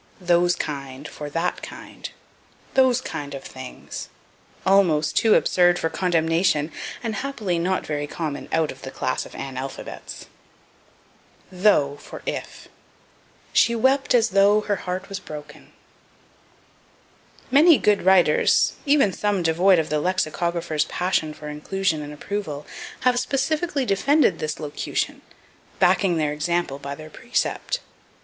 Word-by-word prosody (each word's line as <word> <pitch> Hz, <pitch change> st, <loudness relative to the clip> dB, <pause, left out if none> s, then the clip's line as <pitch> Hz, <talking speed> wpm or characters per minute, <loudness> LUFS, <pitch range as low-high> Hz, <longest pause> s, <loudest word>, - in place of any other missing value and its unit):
Those 175 Hz, -1 st, +3 dB
Kind 140 Hz, -1 st, -5 dB
for 150 Hz, -1 st, -7 dB
That 165 Hz, +4 st, -2 dB
Kind. -, -, -9 dB, 0.6 s
"Those 255 Hz, -2 st, +4 dB
kind 145 Hz, -, -6 dB
of 135 Hz, -, -8 dB
things." 130 Hz, -1 st, -8 dB, 0.6 s
Almost 175 Hz, -6 st, +3 dB
too 220 Hz, -2 st, +5 dB
absurd 175 Hz, -1 st, +4 dB
for 165 Hz, -, -1 dB
condemnation, 165 Hz, -3 st, +1 dB, 0.3 s
and 225 Hz, -2 st, -2 dB
happily 215 Hz, -8 st, -2 dB
not 185 Hz, +2 st, 0 dB
very 145 Hz, -1 st, -3 dB
common 150 Hz, -2 st, -5 dB
out 160 Hz, -2 st, +1 dB
of -, -, -13 dB
the -, -, -6 dB
class -, -, -2 dB
of -, -, -16 dB
analphabets. 135 Hz, 0 st, -7 dB, 1.3 s
Though 180 Hz, -7 st, +3 dB
for -, -, -11 dB
If. -, -, -5 dB, 0.9 s
"She 235 Hz, -, +4 dB
wept 265 Hz, +3 st, +2 dB
as 230 Hz, -2 st, +4 dB
though 200 Hz, +1 st, +4 dB
her 205 Hz, -1 st, -1 dB
heart 185 Hz, +1 st, -4 dB
was 195 Hz, -1 st, -5 dB
broken." 150 Hz, -1 st, -10 dB, 1.8 s
Many 305 Hz, +3 st, +7 dB
good 210 Hz, -1 st, +2 dB
writers, 180 Hz, -4 st, +4 dB
even 280 Hz, -9 st, +4 dB
some 205 Hz, -2 st, 0 dB
devoid 175 Hz, +3 st, +4 dB
of 160 Hz, -, 0 dB
the 150 Hz, 0 st, +1 dB
lexicographers' 170 Hz, -2 st, 0 dB
passion 175 Hz, -4 st, -1 dB
for 150 Hz, 0 st, -10 dB
inclusion 155 Hz, +2 st, -1 dB
and 145 Hz, 0 st, -7 dB
approval, 150 Hz, -2 st, -5 dB, 0.4 s
have 250 Hz, -1 st, +3 dB
specifically 280 Hz, +3 st, 0 dB
defended 235 Hz, -, +3 dB
this 155 Hz, 0 st, -3 dB
locution, 150 Hz, -2 st, -3 dB, 0.6 s
backing 180 Hz, -1 st, +3 dB
their 150 Hz, -2 st, 0 dB
example 160 Hz, -2 st, -1 dB
by 140 Hz, 0 st, -6 dB
their 155 Hz, +1 st, -11 dB
precept. 255 Hz, -, -2 dB
175 Hz, 130 wpm, -23 LUFS, 150-205 Hz, 1.8 s, Many